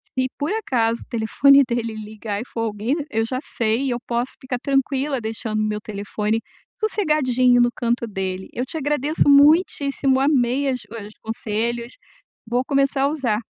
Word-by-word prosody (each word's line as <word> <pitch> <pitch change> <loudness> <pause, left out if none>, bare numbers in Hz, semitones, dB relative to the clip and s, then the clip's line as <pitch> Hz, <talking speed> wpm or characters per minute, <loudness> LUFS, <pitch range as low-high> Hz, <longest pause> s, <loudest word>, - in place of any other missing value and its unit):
se 260 0 +1
por 290 +5 -2
acaso 235 - 0
o - - -11
telefone 275 +5 +5
dele 230 -2 -2
ligar 215 -1 -5
e - - -6
for 230 - -5
alguém, 220 +3 -1 0.2
eu 225 0 0
já 255 +2 -3 0.2
sei 230 +4 +1
e - - 0
eu 245 -1 -1
posso 240 +2 -1
ficar 255 -1 -4
tranquila 275 0 0
deixando 220 -1 -3
o - - +1
meu 210 0 -2
telefone 210 +1 -2 0.4
sossegadinho 265 - +2
no 240 - +4
canto 235 0 0
dele, 190 -2 -4
eu 250 - -2
te 295 - -6
agradeço 295 0 +1
muitíssimo 280 -2 +4
amei 270 -1 +2
as 255 -1 -2
os 215 -2 -8
conselhos, 230 +2 -3 0.5
vou 245 +2 0
começar 275 0 +1
a - - +4
usar. 255 -9 -1
245 Hz, 170 wpm, -22 LUFS, 220-275 Hz, 0.5 s, telefone